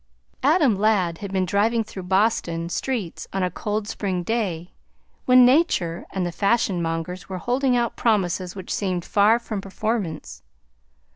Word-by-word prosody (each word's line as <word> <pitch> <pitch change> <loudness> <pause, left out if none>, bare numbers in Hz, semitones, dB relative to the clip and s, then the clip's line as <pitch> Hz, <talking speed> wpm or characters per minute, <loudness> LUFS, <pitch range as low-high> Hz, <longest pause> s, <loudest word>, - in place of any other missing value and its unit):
Adam 290 - +4
Ladd 195 -6 +1
had 200 -2 -6
been 190 -1 +1
driving 220 +5 +1
through 200 -2 -8
Boston 180 -3 0
streets 220 -4 -3
on 195 -1 -1
a 180 - 0
cold 210 +3 -3
spring 190 -4 -2
day 180 -5 -2 0.5
when 255 -1 +7
nature 245 - +2
and 190 -2 -2
the 175 - -2
fashion 200 -1 +1
mongers 165 +3 -4
were 190 - -4
holding 250 +5 +1
out 235 -1 -1
promises 185 -5 0
which 190 -2 -5
seemed 185 -4 -2
far 210 +3 +4
from 220 -4 -5
performance. 195 -4 -4
200 Hz, 150 wpm, -23 LUFS, 180-230 Hz, 0.5 s, when